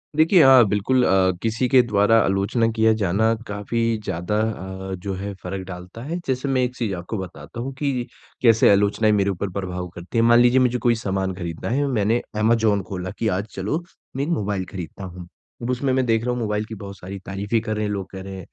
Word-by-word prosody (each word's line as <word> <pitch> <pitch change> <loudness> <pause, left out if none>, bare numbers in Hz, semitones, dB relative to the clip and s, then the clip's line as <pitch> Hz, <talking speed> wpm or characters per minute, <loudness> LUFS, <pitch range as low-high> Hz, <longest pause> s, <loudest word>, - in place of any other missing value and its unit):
देखिए, 160 +3 +5
हाँ, 135 -2 +8
बिल्कुल 105 +6 +2
अ, 95 0 +4
किसी 115 +3 0
के 130 0 +7
द्वारा 110 -1 +3
आलोचना 100 +4 +1
किया 110 0 +4
जाना 105 +4 +2
काफ़ी 105 +3 -3 0.2
ज़्यादा 90 +1 -2
अ, 95 -3 -4
जो 95 +2 -4
है 100 +2 -5
फ़र्क 95 +1 -5
डालता 90 +4 -9
है। 160 +6 -3
जैसे 130 +1 -1
मैं 135 -2 +2
एक 125 0 -2
चीज़ 115 -6 -2
आपको 90 +5 -5
बताता 95 +5 -8
हूँ 135 +3 -4
कि 135 -4 -1 0.3
कैसे 115 -3 +5
आलोचनाएँ 105 +2 +3
मेरे 100 -1 +2
ऊपर 95 +1 -2
प्रभाव 90 -2 -4
करती 85 +6 -6
हैं। 115 - +4
मान 120 0 +6
लीजिए 125 +1 +5
मुझे 125 -1 +2
कोई 120 -1 +5
सामान 95 -4 -2
ख़रीदना 85 -3 -5
है, 140 +5 +1
मैंने 115 -2 +1 0.2
अमेज़न 110 -2 +3
खोला 95 -1 -5
कि 115 - 0
आज 95 0 0
चलो, 110 - -2 0.3
मैं 135 - -1
एक 150 - -3
मोबाइल 105 - -1
ख़रीदता 90 +1 -7
हूँ। 90 -1 -8 0.3
अब 120 - -4
उसमें 130 +2 0
मैं 130 0 +2
देख 115 -1 +1
रहा 125 - 0
हूँ 125 - -2
मोबाइल 105 -2 -1
की 110 - -8
बहुत 100 -1 -9
सारी 95 +3 -8
तारीफ़ें 100 +3 -1
कर 110 -1 -3
रहे 105 0 -1
हैं, 105 - -2
लोग 100 -2 -4
कह 95 - -7
रहे 95 0 -7
हैं, 95 - -9
105 Hz, 225 wpm, -22 LUFS, 95-120 Hz, 0.3 s, हाँ